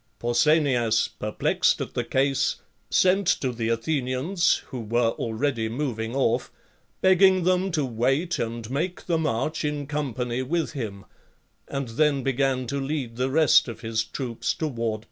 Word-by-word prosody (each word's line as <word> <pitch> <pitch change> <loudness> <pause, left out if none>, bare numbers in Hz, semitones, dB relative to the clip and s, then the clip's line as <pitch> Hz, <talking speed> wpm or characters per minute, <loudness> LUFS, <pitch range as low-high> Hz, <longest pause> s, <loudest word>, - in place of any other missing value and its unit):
Pausanias, 120 -3 +2
perplexed 105 0 +1
at - - -5
the - - -1
case, 135 0 +1 0.3
sent 190 +1 +3
to 130 -6 +1
the 115 -1 -2
Athe 115 +6 0
nians, 140 +9 +1
who 130 - -8
were 115 +1 +1
already 115 0 -2
moving 115 -2 -3
off, 125 -2 +1 0.5
begging 190 0 +5
them 185 +2 +2
to 155 -5 0
wait 135 +8 0
and 115 -1 -3
make 170 +7 -2
the 165 -2 +1
march, 155 0 -1
in. 150 -1 -2
company, 130 -4 -2
with 160 +5 -1
him, 105 -8 -6 0.6
and. 135 -3 -4
then 140 +3 +1
began 135 -1 0
to 140 +3 -3
lead 135 -4 -3
the 130 +2 0
rest 155 0 +5
of 115 -1 -7
his 110 -1 -1
troops 115 +1 -3
toward. 115 -8 -2
130 Hz, 150 wpm, -25 LUFS, 115-155 Hz, 0.6 s, begging